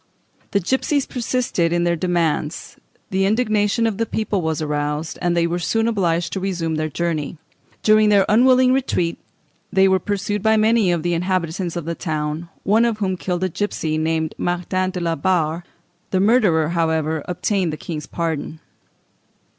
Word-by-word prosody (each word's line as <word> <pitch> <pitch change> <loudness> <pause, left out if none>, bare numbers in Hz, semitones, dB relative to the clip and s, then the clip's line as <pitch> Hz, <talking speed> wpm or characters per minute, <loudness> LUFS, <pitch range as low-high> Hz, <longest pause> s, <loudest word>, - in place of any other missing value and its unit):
The 200 - +1
gipsies 265 - 0
persisted 240 -8 -1
in 175 0 +1
their 170 0 +2
demands, 165 -3 -1 0.3
the 190 0 +1
indignation 215 0 +1
of 225 -3 -1
the 230 - 0
people 215 -3 -1
was 160 -2 -1
aroused, 150 +1 -2
and 175 -1 +1
they 170 - +3
were 170 +1 -1
soon 225 +6 0
obliged 175 -6 0
to 195 - -2
resume 180 -4 -2
their 155 0 -1
journey. 160 -1 -2 0.5
During 215 0 +5
their 200 -2 +5
unwilling 255 +3 +5
retreat, 180 -10 0 0.5
they 190 0 +4
were 190 0 +3
pursued 205 +2 -2
by 220 +1 +3
many 215 -3 +3
of 170 -2 -1
the 175 0 0
inhabitants 175 0 -1
of 170 -3 -4
the 170 - -2
town, 155 0 -3
one 215 +4 +3
of 230 -2 0
whom 190 -3 -1
killed 180 0 -3
a 185 - +1
gipsy 160 -4 -2
named 160 0 -1
Martin 180 +1 -1
de 185 -1 -4
la 170 -1 0
Barre: 165 0 0 0.5
the 185 - +1
murderer, 195 -7 +3
however, 160 -2 0
obtained 180 0 0
the 155 - -5
King's 155 -3 -6
pardon. 160 -2 -3
175 Hz, 170 wpm, -21 LUFS, 165-205 Hz, 0.5 s, During